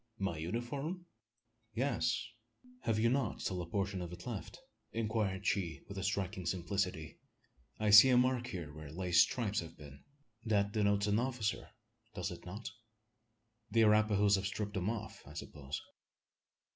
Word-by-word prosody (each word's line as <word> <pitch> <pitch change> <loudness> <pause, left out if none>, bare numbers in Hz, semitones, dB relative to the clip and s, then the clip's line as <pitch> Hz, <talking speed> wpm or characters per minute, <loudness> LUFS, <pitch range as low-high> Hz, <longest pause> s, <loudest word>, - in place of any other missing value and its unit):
"My 95 -6 -2
uniform?" 135 - -3 0.7
"Yes. 125 -2 0 0.6
Have 110 - +2
you 110 +2 +3
not 125 -2 0
still 90 -1 -2
a 85 - -6
portion 95 0 -1
of 90 -1 -5
it 90 - -9
left?" 120 -5 -5 0.3
inquired 110 -3 -1
she, 90 -5 0
with 100 - -8
a 95 - -3
striking 95 -2 -2
simplicity. 90 -2 -2 0.6
"I 105 -1 +2
see 105 +6 +11
a 125 - +5
mark 125 -1 +2
here 85 -8 -6
where 80 -1 -9
lace 90 0 +4
stripes 110 -4 +1
have 85 -1 -8
been. 70 -2 -12 0.4
That 100 -3 +2
denotes 100 -2 +2
an 105 +1 +2
officer 120 -4 -2 0.5
does - - -2
it - - -9
not? 100 +6 -6 1.0
The 115 - +3
Arapahoes 105 -2 +5
have 95 0 -1
stripped 105 0 -3
them 95 0 -1
off, 115 -2 -5
I - - -11
suppose?" 70 -1 -6
100 Hz, 155 wpm, -34 LUFS, 90-115 Hz, 1.0 s, see